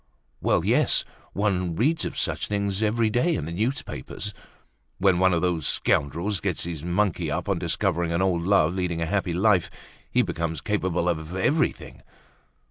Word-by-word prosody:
Well, - - +2
yes! - - +3 0.3
one 90 -4 0
reads 150 - +1
of - - -5
such - - -1
things 100 -1 -1
every 110 +1 +2
day 125 +10 +2
in 75 - -3
the 80 - -5
newspapers. 105 - -3 0.6
When 95 -2 +3
one 95 0 +4
of 85 0 +1
those 85 -5 0
scoundrels 85 +8 0
gets 90 -4 -1
his 80 -3 -5
monkey 90 +2 0
up - - -2
on - - 0
discovering 85 0 0
an 85 - 0
old 95 -3 +1
love 85 -3 +3
leading 90 -3 -2
a 80 - 0
happy 90 -1 -1
life 95 -1 +3 0.4
he - - +3
becomes 80 -2 -3
capable 90 -1 -1
of 80 0 -2
everything. 145 - 0
90 Hz, 165 wpm, -25 LUFS, 85-105 Hz, 0.6 s, one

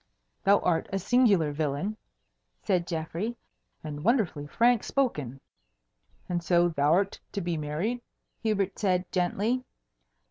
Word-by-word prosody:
"Thou 200 +1 +6
art 165 -2 +1
a 195 - 0
singular 195 -7 +3
villain," 150 +7 -2 0.7
said 180 -4 +1
Geoffrey, 170 +8 -3 0.5
"and 150 -1 -6
wonderfully 195 - +1
frank 235 +6 +3
spoken." 150 - -1 0.9
"And 175 -1 -1
so 175 0 +4
thou'rt 165 +7 +2
to 200 - -1
be 175 -2 -2
married?" 160 +11 -2 0.4
Hubert 200 -4 0
said 185 -3 0
gently. 205 +8 0
180 Hz, 115 wpm, -28 LUFS, 160-215 Hz, 0.9 s, Thou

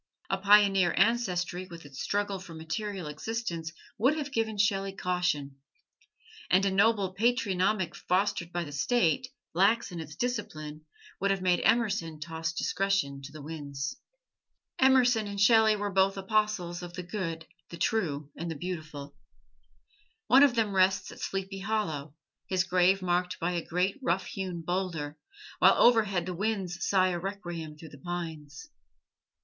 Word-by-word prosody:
A 195 - +1
pioneer 195 -2 +5
ancestry 185 -6 +1
with 170 -3 -11
its 140 -1 -8
struggle 200 -1 -1
for 180 -3 -10
material 175 +4 -4
existence 170 +1 -4 0.3
would 265 +8 +3
have 290 -2 -4
given 220 -3 -1
Shelley 195 -1 +1
caution; 180 -8 -1 0.9
and 190 +2 +4
a 195 - +2
noble 200 -1 +2
patronymic, 195 -4 +1
fostered 190 -2 0
by 175 0 -2
the 145 - -8
State, 175 - +1 0.3
lax 200 +4 +3
in 175 - -6
its 155 -2 -8
discipline, 155 -11 -4 0.3
would 200 - +1
have 195 -1 0
made 180 -1 +3
Emerson 205 -8 +1
toss 160 0 -3
discretion 175 -5 -1
to 140 +1 -9
the 155 -1 -10
winds. 145 -2 -5 0.8
Emerson 250 -4 +4
and 200 0 -5
Shelley 220 +1 +6
were 205 -1 -3
both 195 +1 +2
apostles 195 -3 0
of 175 -1 -8
the 180 - -5
good, 170 -4 -4 0.2
the 170 - -8
true 155 -6 -1
and 170 +1 -5
the 165 - -4
beautiful. 150 -4 -6 1.1
One 260 +2 +6
of 280 -4 +5
them 220 -3 +1
rests 190 0 +2
at - - -12
Sleepy 195 0 -4
Hollow, 165 -9 -2 0.3
his 185 -1 +1
grave 185 +1 +3
marked 180 0 0
by 170 +2 0
a 170 -2 -2
great 180 +7 -1
rough 190 -6 0
hewn 185 -3 -5
boulder, 165 -4 -3 0.4
while - - +7
overhead 210 -7 +4
the 185 - -4
winds 190 -2 -2
sigh 185 -2 +3
a 175 -1 -2
requiem 175 -5 -6
through 160 +1 -11
the 140 - -14
pines. 160 - -6
185 Hz, 155 wpm, -29 LUFS, 165-205 Hz, 1.1 s, while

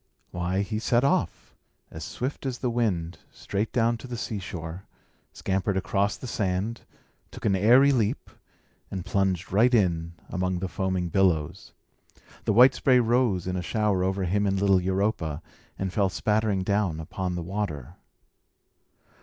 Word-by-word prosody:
Why, 90 +3 -1
he 105 +1 -3
set 120 +2 +2
off, 140 - 0 0.4
as 80 - -7
swift 135 - -4
as 125 -2 -3
the 125 -1 -1
wind, 90 -8 -1
straight 100 +2 -3
down 115 -1 +2
to 130 - -10
the 120 -1 -5
seashore, 95 -5 -6 0.4
scampered 95 0 -1
across 100 +1 0
the - - -9
sand, 105 0 -2 0.5
took - - -10
an 100 -3 +3
airy 125 +8 +6
leap, 115 -6 -1 0.6
and 95 -2 -5
plunged 95 -1 0
right 115 +6 +4
in 85 -7 +1
among 90 0 -1
the 95 +2 -3
foaming 90 0 -2
billows. 85 -5 0 0.7
The - - +2
white 125 +4 +7
spray 130 -2 +3
rose 115 -6 +2
in 90 0 -2
a 90 - -1
shower 105 -1 0
over 95 +1 0
him 100 +3 +1
and 95 0 0
little 95 -2 +4
Europa, 95 -5 -1 0.3
and 95 -1 -3
fell 100 -3 +2
spattering 105 +1 0
down 100 -5 0
upon 90 +3 -4
the 85 - -3
water. 85 -7 -4
95 Hz, 155 wpm, -26 LUFS, 90-110 Hz, 0.7 s, white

